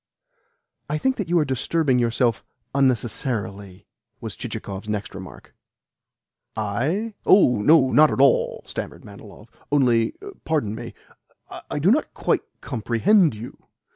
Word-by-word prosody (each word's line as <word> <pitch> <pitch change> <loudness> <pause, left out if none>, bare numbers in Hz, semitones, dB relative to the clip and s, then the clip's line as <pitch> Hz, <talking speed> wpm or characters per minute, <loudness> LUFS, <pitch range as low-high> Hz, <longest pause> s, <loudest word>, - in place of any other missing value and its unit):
"I 150 - 0
think 265 +10 0
that 195 -5 -4
you 175 - +3
are 155 - +3
disturbing 135 +1 0
yourself 120 -2 +1 0.3
unnecessarily," 115 -7 -2 0.3
was - - -6
Chichikov's 100 +2 -6
next 105 -1 -3
remark. 95 -1 -11 1.0
"I? 135 - -1
Oh 125 - +5
no! 140 +1 +5
Not 155 0 +6
at - - -3
all!" 140 - +3
stammered - - -7
Manilov. 105 +2 -13 0.2
"Only 120 -6 +2 0.3
pardon 145 -10 -1
me 120 +1 -8 0.7
I - - -3
do 165 +7 +3
not 295 +6 0
quite - - 0 0.2
comprehend 130 - +2
you. 115 +4 -11
125 Hz, 125 wpm, -23 LUFS, 110-155 Hz, 1.0 s, Not